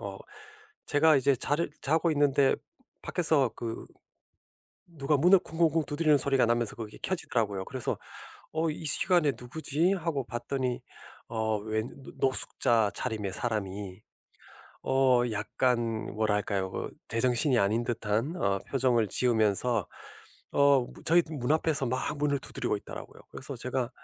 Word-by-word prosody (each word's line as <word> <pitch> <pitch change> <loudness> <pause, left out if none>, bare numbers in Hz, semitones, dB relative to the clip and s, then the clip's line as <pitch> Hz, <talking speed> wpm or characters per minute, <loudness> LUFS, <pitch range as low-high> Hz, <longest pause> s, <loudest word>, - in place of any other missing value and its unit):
어 100 -1 -7 0.7
제가 155 +1 +4
이제 135 +1 +3
자 145 +4 0 0.3
자고 160 +4 +1
있는데 140 -2 +3 0.5
밖에서 155 -7 +2
그 115 -1 -6 1.0
누가 150 -3 -1
문을 180 +7 +5
쿵쿵쿵 165 -2 0
두드리는 150 -1 +2
소리가 135 -2 +4
나면서 120 -1 0
그게 110 -2 -8
켜지더라고요. 110 - -1
그래서 130 -3 -3 0.5
'어 160 +1 -1
이 155 - -8
시간에 155 -1 +4
누구지?' 155 +7 0
하고 165 -7 -3
봤더니 120 +3 -3 0.5
어 110 -1 -1
웬 110 +2 -3 0.2
노 - - -11
노숙자 115 -4 +3
차림의 105 -6 -3
사람이 100 -4 -4 0.8
어 130 -2 +3
약간 115 +1 -1
뭐랄까요? 105 -3 0
그 - - -4 0.2
제정신이 125 +3 +2
아닌 105 +3 +1
듯한 115 - -2
어 100 - 0
표정을 125 -5 +2
지으면서 110 0 +1 0.6
어 140 -1 +4
무 - - -16
저희 170 +2 +5
문 130 -5 -4
앞에서 155 -3 +1
막 130 +4 -1
문을 145 -1 0
두드리고 - - -3
있더라고요. - - -11
그래서 140 -1 -7
제가 125 0 -3
125 Hz, 290 characters per minute, -28 LUFS, 110-145 Hz, 1.0 s, 문을